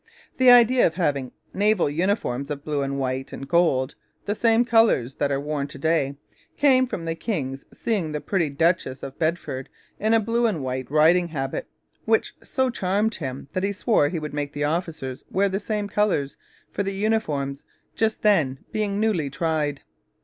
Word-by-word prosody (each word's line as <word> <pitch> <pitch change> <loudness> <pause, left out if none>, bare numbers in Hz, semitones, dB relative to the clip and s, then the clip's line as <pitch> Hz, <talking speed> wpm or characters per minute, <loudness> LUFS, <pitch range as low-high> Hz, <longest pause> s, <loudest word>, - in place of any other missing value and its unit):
The 255 -1 +6
idea 245 +1 +7
of 160 - -5
having 140 -7 -1 0.2
naval 205 -3 +2
uniforms 145 - -1
of 145 -1 -5
blue 150 -2 -1
and 140 0 -2
white 130 0 -2
and 135 - -7
gold 140 -5 +2 0.3
the 205 - 0
same 230 +2 +3
colours 225 - +3
that 140 -1 0
are 135 - +1
worn 145 -1 -2
to 140 - -11
day 140 -2 +1 0.4
came 260 -3 +4
from 170 -8 -5
the 165 - -1
king's 140 - -4
seeing 195 -9 -2
the 150 - -2
pretty 170 -2 0
Duchess 140 -3 0
of 135 - -8
Bedford 155 -5 -2 0.3
in 220 +2 +3
a - - +5
blue 230 +2 +1
and 170 -11 -2
white 130 0 -3
riding 165 +4 +4
habit, 135 -5 -4 0.4
which 220 0 +1
so 260 -1 0
charmed 205 +1 0
him 135 -6 -6
that 185 - -1
he 200 +1 0
swore 200 - +2
he 170 - -3
would 150 -2 -5
make 145 0 -3
the 145 -1 -2
officers 155 -4 -3
wear 200 +1 +2
the 195 +1 -1
same 210 0 -2
colours 200 -10 0 0.4
for - - -2
the 195 0 -2
uniforms 155 -10 -1 0.3
just 220 -1 0
then 160 -11 +3
being 205 -2 -1
newly 200 -10 +1
tried. 150 -2 -1
165 Hz, 180 wpm, -24 LUFS, 140-210 Hz, 0.4 s, idea